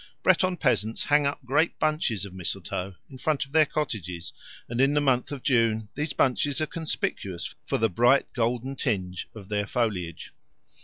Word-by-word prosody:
Breton 185 0 +3
peasants 115 -7 +1
hang 145 -1 +3
up 140 -1 -4
great 145 +6 +2
bunches 155 - 0
of 95 - -10
mistletoe 95 +1 -3 0.2
in 130 - -10
front 155 -1 0
of 135 - -20
their 155 -1 +5
cottages, 90 - -3 0.3
and 120 +1 -1
in 140 +2 +4
the - - +5
month 130 -3 +1
of 140 -3 -6
June 115 -4 +2
these 150 +1 -2
bunches 135 +2 +2
are 155 - +1
conspicuous 150 - -3
for - - +1
the 115 - +3
bright 120 +8 +3
golden 125 +3 -1
tinge 95 -9 -2
of 100 -4 -10
their 105 -1 -1
foliage. 95 -10 -2
125 Hz, 170 wpm, -27 LUFS, 105-145 Hz, 0.3 s, their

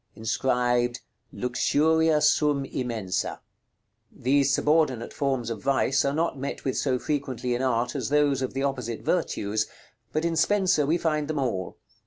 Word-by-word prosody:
Inscribed 120 +1 0 0.3
"LUXURIA 155 +5 +2
SUM 150 -2 +3
IMENSA." 115 -8 -3 0.7
These 140 +2 +2
subordinate 150 -5 +1
forms 130 -5 -1
of 110 - -5
vice 135 0 +2
are 140 - +1
not 155 -2 -1
met 140 - -5
with 130 - 0
so 130 -3 +1
frequently 130 -3 -2
in 120 - -1
art 125 0 0
as 130 -4 -2
those 145 -2 +2
of 130 0 -3
the 135 - -1
opposite 125 -5 -2
virtues, 110 - 0 0.4
but 155 +2 -1
in 170 -1 0
Spenser 180 -3 +2
we 165 +3 +2
find 155 -3 -1
them 155 -1 -3
all. 115 -10 -2
135 Hz, 150 wpm, -26 LUFS, 125-150 Hz, 0.7 s, SUM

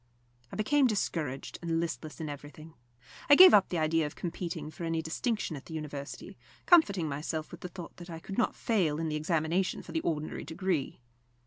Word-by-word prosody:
I - - -7
became 270 +6 +3
discouraged 160 - -2
and 165 -1 0
listless 165 -2 -4
in 160 - -4
everything. 150 +2 -9 0.6
I 290 - +10
gave 370 +3 +10
up 200 - +6
the 175 - -1
idea 160 0 +2
of 150 - -10
competing 170 -3 -5
for 170 - -8
any 165 0 0
distinction 165 +3 -2
at 140 - -10
the 160 - -7
University, 145 -2 -7 0.3
comforting 200 - +5
myself 155 +2 -4
with 175 - -10
the 180 - -6
thought 175 -1 -9
that 175 0 -10
I 165 - -6
could 195 +4 -7
not - - +1
fail 180 -11 +1
in 165 -1 -1
the 155 - -2
examination 165 +4 0
for - - -10
the 325 - -1
ordinary 155 - -2
degree. 165 -4 -2
165 Hz, 195 wpm, -30 LUFS, 155-185 Hz, 0.6 s, I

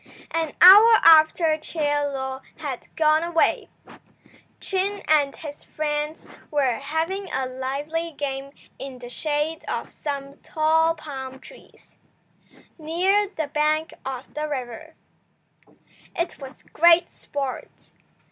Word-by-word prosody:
An 325 -3 -2
hour 415 +5 +10
after 315 0 +6
Chie 320 +1 -8 0.3
Lo 265 -1 -5 0.2
had 285 -6 -6
gone 310 0 +3
away, 335 -1 +1 0.9
Chin 390 +1 -2
and 295 -3 +3
his 295 -2 -9
friends 300 0 -4 0.2
were 270 -5 0
having 330 +7 -3
a 265 - -1
lively 280 +6 -4
game 275 -2 -5 0.3
in 270 -2 -7
the 245 -1 -10
shade 300 +4 -2
of - - -4
some 280 -1 -6
tall 320 +1 +1
palm 265 -4 -8
trees, - - -18 0.8
near 370 +6 +1
the 320 -6 -4
bank 305 +2 0
of 260 -1 -7
the 305 0 -3
river. 265 +3 -6 1.2
It 340 0 -3
was 270 0 -11
great 340 +1 +4
sport. 275 -2 -7
305 Hz, 115 wpm, -23 LUFS, 275-330 Hz, 1.2 s, hour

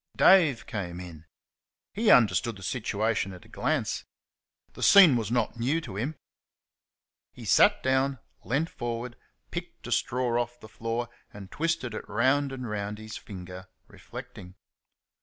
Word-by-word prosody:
Dave 165 -11 +5
came 90 -5 -5
in. 85 -3 -10 0.7
He 220 +2 +1
understood 115 0 +4
the 95 - -12
situation 105 0 -1
at 90 - -13
a - - -16
glance. - - -1 0.7
The - - -11
scene 185 -9 +8
was 110 -4 -1
not 120 0 -1
new 135 +8 +1
to 115 -11 -8
him. 130 +10 -3 1.2
He - - -11
sat - - +5
down, 130 +1 +1 0.3
leant 150 +7 -1
forward, 120 0 -4 0.4
picked - - -7
a - - -6
straw 120 -1 +1
off 120 0 -6
the 110 - -12
flor 115 +2 -3 0.2
and 100 -2 -11
twisted 165 -7 -1
it - - -7
round 135 +3 +2
and 130 -2 -5
round 105 -1 -4
his 110 0 -8
finger, 90 -1 -9 0.2
reflecting. 90 +1 -11
115 Hz, 145 wpm, -28 LUFS, 100-130 Hz, 1.2 s, scene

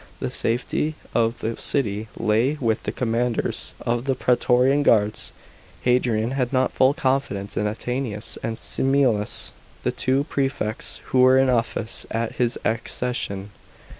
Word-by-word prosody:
The - - -3
safety 125 +6 0 0.2
of 115 0 +1
the 115 +1 -2
city 110 -5 -1
lay 115 +7 +2
with 115 -3 0
the - - -1
commanders 120 0 -1
of 120 +1 -1
the 135 -1 +1
praetorian 125 +3 +3
guards. 105 -5 +2 0.5
Hadrian 125 -2 +2
had 130 -2 -1
not 130 -1 +2
full 130 +2 +3
confidence 130 -9 -1
in 105 - 0
Attianus 115 0 -3
and 115 -1 -3
Similis, 130 -5 +1 0.3
the - - +1
two 135 +2 +1
prefects 135 -7 -3
who 130 - +4
were 130 +1 +6
in 130 -1 +4
office 115 -2 -1
at 115 0 -3
his 120 -1 +1
accession. 110 -3 -2
120 Hz, 135 wpm, -23 LUFS, 110-130 Hz, 0.5 s, were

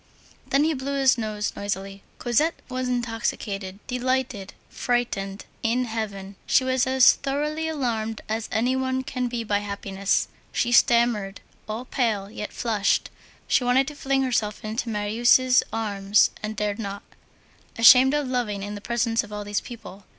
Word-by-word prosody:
Then 275 +2 +3
he 320 +1 +2
blew 275 0 -3
his 265 -2 +5
nose 215 -3 -3
noisily. 195 -1 -4 0.2
Cosette 295 +7 +1
was 255 0 -2
intoxicated, 225 -5 -3
delighted, 250 -5 -2
frightened, 205 -5 -2 0.2
in 240 +2 +1
heaven. 200 -4 -5
She - - +4
was 260 0 +1
as 260 -1 +6
thoroughly 300 +3 -2
alarmed 230 -8 -2
as 220 +1 -3
any 245 +3 +1
one 260 0 -1
can 250 -1 -2
be 240 -1 -3
by 205 -2 0
happiness. 200 -1 -1 0.2
She 240 - 0
stammered 235 -5 +3 0.3
all 225 +4 -4
pale, 215 -7 -1
yet 210 -1 -6
flushed, 215 -4 0 0.4
she - - +3
wanted 255 +2 +3
to 295 - -10
fling 270 -1 0
herself 220 -5 -1
into 220 +2 -3
Marius' 235 +4 +3
arms, 205 -2 +2
and 215 0 -4
dared 210 0 -2
not. 200 -2 -5 0.7
Ashamed 255 +4 +8
of 295 -2 0
loving 230 -6 -2
in 205 +1 -5
the 205 - -7
presence 235 0 0
of 210 - -12
all 210 0 -5
these 205 0 -2
people. 205 -5 -11
230 Hz, 155 wpm, -24 LUFS, 205-255 Hz, 0.7 s, Ashamed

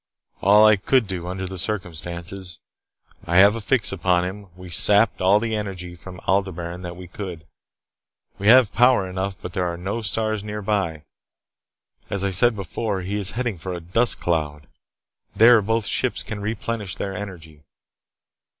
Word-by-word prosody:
"All 105 +2 +6
that 110 - +7
I - - +5
could 125 +5 +2
do 90 -3 -5
under 95 +1 -4
the 95 0 -5
circumstances. 90 -2 -4 0.7
I 85 - +1
have 100 +3 +6
a 115 - -5
fix 110 +3 +2
upon 90 -1 +1
him. 100 +2 -7
We 90 0 -11
sapped 105 +6 +5
all 95 +3 +4
the 110 0 -2
energy 95 -4 -5
from 90 +1 -11
Aldebaran 90 -2 -2
that 90 -1 -7
we 90 0 -10
could. 90 -3 -8 0.9
We 100 - -2
have 125 -2 +6
power 120 -4 +4
enough, 95 +1 -4
but 90 - -8
there 90 -1 -1
are 85 - -7
no 100 +6 -4
stars 110 0 -2
nearby. 100 -6 -3 1.1
As 100 -1 -1
I 100 - 0
said 115 +5 +4
before, 100 +1 -4
he 95 +3 -5
is 100 -2 +3
heading 120 -7 -2
for 90 +2 -5
a - - -5
dust 105 +8 +1
cloud. 75 -4 -2 0.7
There, 115 0 +6
both 110 +1 -1
ships - - -1
can 105 0 -6
replenish 105 -1 -4
their 95 - -4
energy. 85 -6 -9
95 Hz, 170 wpm, -22 LUFS, 90-105 Hz, 1.1 s, that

